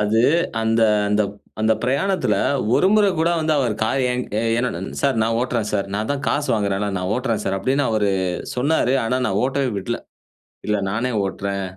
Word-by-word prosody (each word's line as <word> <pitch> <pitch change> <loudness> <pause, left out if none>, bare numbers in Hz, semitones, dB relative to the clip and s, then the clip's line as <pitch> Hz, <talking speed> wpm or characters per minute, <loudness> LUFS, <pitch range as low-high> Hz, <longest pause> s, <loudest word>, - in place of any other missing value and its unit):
அது 105 +2 +2 0.4
அந்த 115 0 +2 0.3
அந்த- 105 +1 +2 0.4
அந்த 110 +1 +3
பிரயாணத்ல 140 - +1 0.4
ஒரு - - +4
முற 210 -1 +5
கூட 165 +2 +2
வந்து 155 0 +1
அவர் 125 -5 +1
"கார் 135 +5 +1
என்- 125 0 -1 0.4
என்னோட 120 -8 -1 0.2
சார் 135 -4 +1
நான் 115 +1 +1
ஓட்றேன் 120 -4 -1
சார், 100 -2 -1
நான் 105 +2 -2
தான் 140 - -4
காசு 145 0 0
வாங்குறேன்ல, 100 -1 0
நான் 90 +1 -3
ஓட்றேன் 115 -4 -1
சார்" 95 0 0
அப்டின்னு 135 +8 +1
அவரு 105 -2 +1 0.5
சொன்னாரு. 135 0 +2
ஆனா, 120 +3 0
நான் 100 -3 0
ஓட்டவே 135 0 0
விட்ல. 120 +5 -3 0.7
இல்ல 105 0 +1
நானே 120 +5 -1
ஓட்றேன் 100 0 -3
115 Hz, 175 wpm, -21 LUFS, 105-135 Hz, 0.7 s, முற